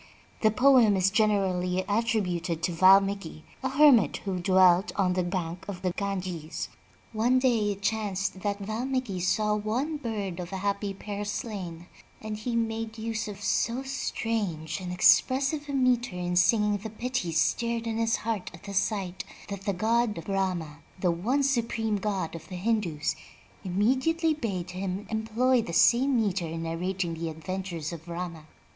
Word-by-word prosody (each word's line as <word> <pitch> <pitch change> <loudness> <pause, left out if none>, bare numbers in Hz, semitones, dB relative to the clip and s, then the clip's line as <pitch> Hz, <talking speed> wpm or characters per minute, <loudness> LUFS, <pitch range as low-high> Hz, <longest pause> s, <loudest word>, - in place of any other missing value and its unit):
The 215 - +5
poem 240 -2 +5
is 190 +1 +3
generally 190 -4 +1
attrib 220 0 +1
uted 170 -2 -3
to 180 - +1
Valmiki, 190 -2 +4 0.2
a 265 - -1
hermit 265 - +5
who 190 -2 -2
dwelt 185 +1 +4
on 185 -2 +2
the 185 - +1
bank 175 -1 -3
of 195 -2 -6
the 180 - +1
Ganges. 185 -5 -4 0.4
One 235 +4 +3
day 230 -5 +2
it 200 0 -14
chanced 200 -3 -1
that 200 0 -1
Valmiki 220 0 -2
saw 210 +4 +1
one 235 +9 -1
bird 210 -9 -4
of 180 +1 -6
a 190 - -3
happy 200 0 -1
pair 205 +1 -5
slain, 190 -5 -5 0.3
and 215 -1 -5
he 230 +3 -3
made 225 -1 -2
use 225 0 -3
of 205 -1 -8
so 240 +5 0
strange 220 - -2
and 180 -1 -5
expressive 275 - +3
a - - -3
meter 250 -5 +2
in 180 0 -2
singing 210 +3 +3
the 215 +2 -7
pity 235 -4 -3
stirred 230 +9 0
in 225 -1 -2
his 230 0 +2
heart 220 -4 -3
at 165 - -16
the 200 - -7
sight, 195 -2 -1 0.3
that 200 -1 -6
the 200 - +1
god 220 -1 +1
Brahma, 180 -6 -2 0.2
the 180 -1 +2
one 235 +12 0
supreme 230 -5 0
God 195 -4 -2
of 165 -2 -9
the 185 - -6
Hindus, 180 -6 -1 0.5
immediately 260 - +1
bade 195 - -4
him 190 +2 -4
employ 230 +3 +2
the 170 - -6
same 250 +6 +4
meter 195 -5 0
in 165 +1 -5
narrating 175 +2 -2
the 165 0 -4
adventures 170 0 -5
of 165 0 -9
Rama. 170 -2 -6
200 Hz, 165 wpm, -28 LUFS, 180-230 Hz, 0.5 s, The